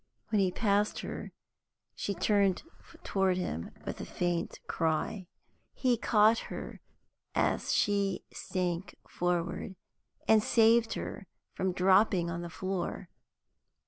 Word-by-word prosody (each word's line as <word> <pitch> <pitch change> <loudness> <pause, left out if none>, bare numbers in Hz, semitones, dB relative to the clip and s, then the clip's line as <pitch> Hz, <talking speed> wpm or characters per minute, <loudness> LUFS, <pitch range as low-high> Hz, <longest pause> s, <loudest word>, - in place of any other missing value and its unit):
When 215 -2 +2
he 190 - +3
passed 205 0 +1
her - - -6 0.6
she 200 - -3
turned 195 0 +2 0.4
toward 190 -2 +1
him 85 - -3 0.2
with - - -5
a - - -5
faint 175 -1 -2
cry. 165 +4 -1 0.5
He 255 -2 +2
caught 220 0 +4
her - - -7 0.5
as - - +1
she 200 -2 +1
sank 180 0 -3
forward, 175 +1 -2 0.5
and 220 -1 +6
saved 225 +1 +4
her 195 - -6 0.3
from 190 0 0
dropping 185 -1 +3
on 170 +1 -3
the 175 - -6
floor. 185 +1 -4
190 Hz, 115 wpm, -31 LUFS, 175-210 Hz, 0.6 s, and